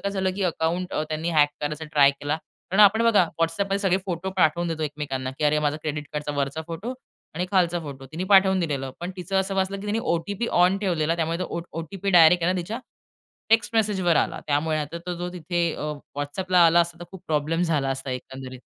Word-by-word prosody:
काय 200 - -2
झालं, 190 -1 0
की 200 - -3
अकाउंट 175 +1 -1 0.2
त्यांनी 160 +2 -2
हॅक 150 -2 +4
करायचा 150 +2 -3
ट्राय 140 -2 +6
केला. 145 +2 -3 0.3
कारण 195 +3 +3
आपण 215 +3 +6
बघा 210 -6 +5 0.2
WhatsAppमध्ये 195 +4 0
सगळे 190 -2 +2
फोटो 180 +1 -3
पाठवून 170 0 +2
देतो 160 -1 -3
एकमेकांना, 140 -3 -3
की 150 - 0
अरे 150 +1 +3
माझ्या 150 0 0
क्रेडिट 150 -1 -3
कार्डचा 150 0 -3
वरचा 140 +3 -2
फोटो 195 +9 -5 0.4
आणि 180 +2 -2
खालचा 175 -3 +2
फोटो 135 -3 -8
तिने 175 +4 -3
पाठवून 190 -1 +6
दिलेलं. 140 -5 -2
पण 175 +2 -4
तिचं 190 +2 -3
असं 195 0 -3
वाचलं, 195 +1 -1
की 210 - -7
तिने 215 +2 0 0.2
ओ-टी-पी 200 +7 -3 0.2
ऑन 185 +2 +3
ठेवलेला. 170 -4 0
त्यामुळे 165 0 -1
तो 185 - -2
ओ 170 - -4
ओ - - -4 0.2
ओ-टी-पी 195 +4 -4
डायरेक्ट 170 0 +6
आहे 180 - +3
ना 185 - -2
तिच्या 215 +8 -5 0.7
टेक्स्ट 225 +1 +3
मेसेजवर 190 -6 +2
आला. - - 0
त्यामुळे 155 +2 +1
आता 150 +3 -4
तो 180 - -2
जो 175 +1 -4
तिथे 170 -1 -1
अ, 150 0 -3 0.3
WhatsAppला 180 +5 +2
आला 170 +1 +5
असता 170 0 -2
तर 175 - -6
खूप 190 -2 -11
प्रॉब्लेम 155 +3 0
झाला 150 -5 +1
असता 135 0 -4
एकंदरीत. 130 0 -7
170 Hz, 215 wpm, -25 LUFS, 150-190 Hz, 0.7 s, ट्राय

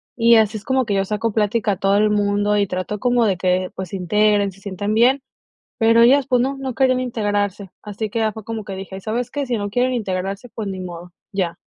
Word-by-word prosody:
y 235 0 +5
así 220 0 +3
es 205 - -10
como 260 +1 +1
que 205 - -1
yo 195 0 +1
saco 215 +2 -2
plática 210 0 +1
a 195 - -2
todo 195 +1 +2
el 210 0 +3
mundo, 205 0 +1
y 200 -1 +2
trato 185 +3 -4
como 245 0 +2
de 195 -4 +1
que, 185 0 0
pues, 185 -2 -5
se - - -6
integren, 205 +2 +2
se 190 - -18
sientan 200 +1 -3
bien, 250 +5 +4 0.6
pero 230 0 +5
ellas, 270 +2 +5
pues, 250 - +3
no, 270 +2 -1
no 265 -3 -4
querían 255 -1 +3
integrarse. 205 -5 -2
Así 210 +1 -5
que 230 - -2
ya 220 -1 +1
fue 220 +1 -9
como 225 0 -5
que 195 -1 -7
dije: 190 0 -7
"¿Sabes 235 +4 -3
qué? 285 -1 -3
Si 240 -2 0
no 205 -1 -3
quieren 250 +4 +1
integrarse, 195 0 -3
pues, 220 -2 -6
ni 190 -1 -5
modo, 175 -1 -8 0.2
ya". 180 -4 -2
210 Hz, 240 wpm, -20 LUFS, 195-235 Hz, 0.6 s, y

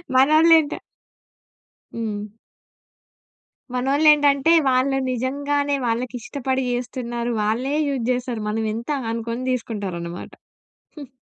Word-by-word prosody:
మనోళ్ళు 310 +5 +6
ఏంట 305 -1 -3 1.2
హ్మ్. 210 -2 -4 1.4
మనోళ్ళు 270 +5 +2
ఏంటంటే 290 0 +3 0.2
వాళ్ళు 265 +1 +2
నిజంగానే 285 +3 -1
వాళ్ళకి 240 +2 -2
ఇష్టపడి 265 +1 -2
చేస్తున్నారు. 240 -1 -3
వాళ్ళే 240 +7 0
యూజ్ 260 -4 -2
చేస్తారు. 245 -3 -3
మనం 220 +1 -1
ఎంత? 230 +4 -6 0.2
అనుకుని 230 +2 -4
తీసుకుంటారు 210 -7 -3
అన్నమాట. 170 +1 -7 0.7
హ్మ్. 280 -3 -10
255 Hz, 100 wpm, -22 LUFS, 230-280 Hz, 1.4 s, మనోళ్ళు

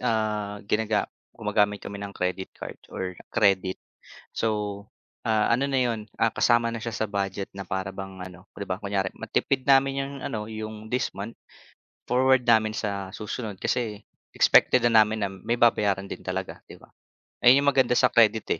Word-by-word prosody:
ah, 105 -2 -1
ginaga 105 0 +1 0.3
gumagamit 105 0 +1
kami 100 0 -6
ng 100 0 -7
credit 90 +1 -2
card - - -8
or 95 -1 -4 0.2
credit. 95 -2 +2 0.5
So, 105 -2 -2 0.4
ah, 110 -1 +2
ano 125 +4 +2
na 135 -2 +1
'yon, 115 -3 -1 0.2
ah, 115 - +5
kasama 120 0 +2
na 115 - -4
siya 115 0 -5
sa 110 -1 -2
budget 100 -1 -3
na 100 - -5
para 95 +1 -3
bang 95 -1 -8
ano, 90 0 -10
'di 100 - -6
ba? 95 - -1
Kunyari 100 -2 -1
matipid 130 -1 -1
namin 135 0 +5
yung 140 - -8
ano, 105 -1 -4
yung 110 0 -7
this 125 +3 -1
month, 105 +4 -5 0.7
forward 130 +1 +3
namin 110 -2 +3
sa 100 -2 -3
susunod 105 +1 -6
kasi 110 0 -2 0.3
expected 125 -2 +5
na 115 -2 +6
namin 110 0 +2
na - - 0
may 105 +5 -2
babayaran 105 -5 +3
din - - -7
talaga, - - -5
'di - - -11
ba? - - -20 0.5
Ayun 130 +3 +6
yung 145 - +5
maganda 125 -2 +3
sa - - +4
credit, 110 -1 +4
110 Hz, 175 wpm, -26 LUFS, 100-115 Hz, 0.7 s, na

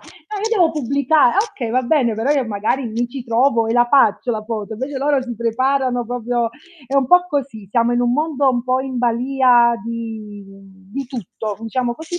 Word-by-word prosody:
"Eh, 410 +6 -8
io 460 - +2
devo 335 -3 +4
pubblicare". 280 -1 +2
Ah, - - -3
okay, 235 -4 -5
va 255 +2 +2
bene, 255 -3 +1
però 225 +5 -2
io 275 -3 +1
magari 220 +5 -1
mi 235 +2 -2
ci 250 0 -7
trovo 230 0 +2
e 225 - 0
la 240 0 +4
faccio 245 -3 +3
la 215 -2 -2
foto, 220 -1 -5
invece 265 +4 -4
loro 280 -1 +1
si 245 -2 -6
preparano 245 +2 0
proprio 240 0 -2 0.4
è 270 - -5
un 270 -2 +3
po' 360 +4 +5
così, 265 - -4
siamo 235 +1 +2
in 245 - +1
un 240 0 +1
mondo 290 -2 +1
un 245 -2 -1
po' 255 +1 0
in 260 -2 -4
balìa 245 0 +3
di 220 -3 -7 0.5
di 275 -1 -4
tutto, 220 -4 -6
diciamo 240 +1 -2
così, 325 +4 -6
245 Hz, 200 wpm, -19 LUFS, 230-275 Hz, 0.5 s, po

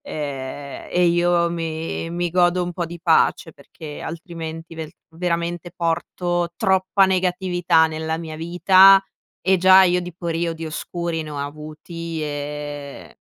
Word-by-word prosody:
ehm, 140 -1 -6
e 180 0 +2
io 175 0 +2
mi 165 -1 -4
mi 175 0 -2
godo 180 +1 +3
un 175 - -3
po' 175 -1 -3
di 170 +1 -9
pace 160 -1 +2
perché 150 +1 -11
altrimenti 165 0 -7
velt 160 0 -7 0.2
veramente 170 +1 -3
porto 175 +1 -1
troppa 190 -1 +3
negatività 180 -3 +2
nella 160 0 -3
mia 160 -1 -7
vita 185 +4 +6 0.4
e 190 +1 +3
già 190 +1 +7
io 180 -1 +3
di 180 -1 -8
periodi 165 -1 -3
oscuri 165 +1 -4
ne 155 - -9
ho 145 - -6
avuti 155 +3 -6
e, 145 -1 -6
170 Hz, 135 wpm, -22 LUFS, 160-175 Hz, 0.4 s, già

